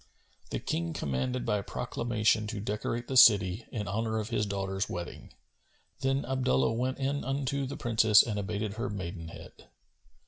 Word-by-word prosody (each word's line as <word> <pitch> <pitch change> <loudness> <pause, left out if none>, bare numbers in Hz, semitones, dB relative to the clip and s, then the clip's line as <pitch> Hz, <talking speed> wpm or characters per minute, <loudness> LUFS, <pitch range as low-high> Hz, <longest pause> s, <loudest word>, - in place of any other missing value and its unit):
The - - -2
King 85 0 -2
commanded 125 - -2
by 105 -1 +1
proclamation 110 -1 0
to 110 -1 -4
decorate 110 +3 -3
the 135 - -3
city, 105 -3 +6
in 105 -3 -4
honour 110 +3 -1
of 110 0 -3
his 105 -3 0
daughter's 95 -1 -2
wedding. 85 -1 -6 0.7
Then 135 +1 0
Abdullah 115 - +1
went 130 +3 -1
in 140 +1 -1
unto 135 0 -1
the 140 +3 -6
Princess 110 -5 +5
and 105 -3 -3
abated 105 0 -3
her 115 - -2
maidenhead. 85 -4 -8
110 Hz, 150 wpm, -30 LUFS, 100-125 Hz, 0.7 s, city